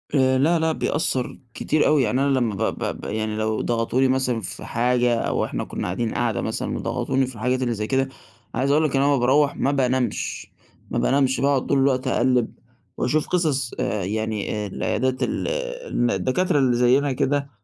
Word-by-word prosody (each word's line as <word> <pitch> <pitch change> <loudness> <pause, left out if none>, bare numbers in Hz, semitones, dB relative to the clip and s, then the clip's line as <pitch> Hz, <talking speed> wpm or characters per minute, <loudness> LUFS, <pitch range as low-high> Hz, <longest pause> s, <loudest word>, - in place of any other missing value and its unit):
آآ، 130 -1 +3
لأ، 160 +5 +3
لأ 160 0 +1
بيأثر 145 -5 -1 0.2
كتير 155 - +1
أوي 150 -3 +4
يعني 125 +4 0
أنا 135 -2 +2
لمَّا 115 -5 -1
ب - - -7
ب - - -3
ب - - -9
يعني 110 0 -2
لو 110 0 -1
ضغطوني 120 +3 +1
مثلًا 130 -3 0
في 95 - -7
حاجة 120 0 +1
أو 115 - 0
إحنا - - -3
كنّا - - -5
قاعدين 110 +5 -2
قعدة 120 -3 0
مثلًا - - -3
وضغطوني 135 0 -1
في 130 - -9
الحاجات 125 +4 -1
اللي 120 -2 0
زي 105 0 -3
كده، 135 0 +1 0.5
عايز 135 +3 +1
أقول 150 +2 +3
لك 150 -3 0
ان 135 - +3
أنا 140 - +3
لمَّا 140 - +3
باروَّح 140 +4 +3
ما 140 - +1
بانامش، 130 -2 -1 0.4
ما - - -1
بانامش 135 -1 +2
باقعد 140 -1 +2
طول - - +2
الوقت 135 -1 +1
أقلِّب 125 -2 +1 0.4
وأشوف 150 +5 0
قصص 145 -8 0
آآ، 105 -3 -1
يعني 110 +1 -2
آآ، - - -4
العيادات 130 +6 -1
ال - - -2 0.4
الن 120 0 +1
الدكاترة 145 - +1
اللي 130 -3 +3
زينا 130 +4 +3
كده 140 +2 0
130 Hz, 195 wpm, -23 LUFS, 120-140 Hz, 0.5 s, أوي